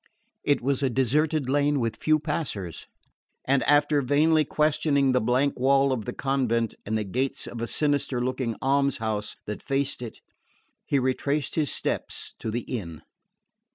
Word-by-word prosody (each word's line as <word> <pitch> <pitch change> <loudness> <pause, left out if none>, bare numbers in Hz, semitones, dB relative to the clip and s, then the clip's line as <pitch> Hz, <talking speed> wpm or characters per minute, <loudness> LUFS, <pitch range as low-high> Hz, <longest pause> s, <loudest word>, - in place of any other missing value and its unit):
It 145 - +2
was 135 +1 0
a 135 - +2
deserted 140 +4 +1
lane 145 +1 +2
with 115 -2 -1
few 155 +6 +2
passers; 145 - -4 0.6
and 135 0 +3
after 145 0 +4
vainly 155 +4 +3
questioning 150 -2 +2
the 125 - +2
blank 125 +5 +1
wall 135 +1 +4
of 115 -5 -2
the - - -3
convent 120 -5 0
and 110 +1 0
the 110 - -1
gates 130 +7 -2
of 120 - -7
a 115 - -2
sinister 145 -3 0
looking 125 -2 -2
alms 140 0 +2
house 110 -2 -3
that 105 - -5
faced 135 -1 -1
it, 120 -3 -7 0.7
he 140 - +2
retraced 135 +2 0
his 150 -4 0
steps - - -2
to - - -4
the 120 +3 -2
inn. 85 -11 -6
135 Hz, 160 wpm, -26 LUFS, 120-145 Hz, 0.7 s, after